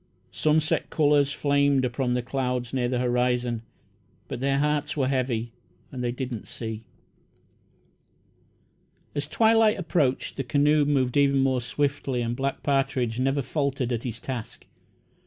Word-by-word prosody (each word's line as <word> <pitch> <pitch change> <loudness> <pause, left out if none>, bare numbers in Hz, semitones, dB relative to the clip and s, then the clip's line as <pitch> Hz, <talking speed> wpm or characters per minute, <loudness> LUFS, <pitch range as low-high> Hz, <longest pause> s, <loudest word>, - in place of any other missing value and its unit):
Sunset 155 +1 +1
colours 145 -2 +3
flamed 140 -2 +2
upon 125 0 -1
the 125 - -1
clouds 125 -1 -2
near 125 -2 0
the 125 - 0
horizon, 125 -1 0 0.7
but - - -5
their 135 +1 +1
hearts 150 +1 0
were 135 -3 +2
heavy, 125 -3 -1 0.4
and 125 -2 -5
they 120 - 0
did 125 +1 -5
not 115 -4 -6
see. 110 -2 -6 2.3
As 145 0 -3
twilight 220 +5 +4
approached, 155 -7 0
the 135 - -1
canoe 145 +3 +3
moved 135 -3 +1
even 140 -1 +4
more 130 -2 +1
swiftly 135 -1 -1
and 120 +1 -2
Black 135 +2 -3
Partridge 135 -4 0
never 135 +2 +1
faltered 135 -3 -1
at 115 - -2
his 115 -2 -4
task. 120 -2 -6
135 Hz, 140 wpm, -26 LUFS, 125-145 Hz, 2.3 s, twilight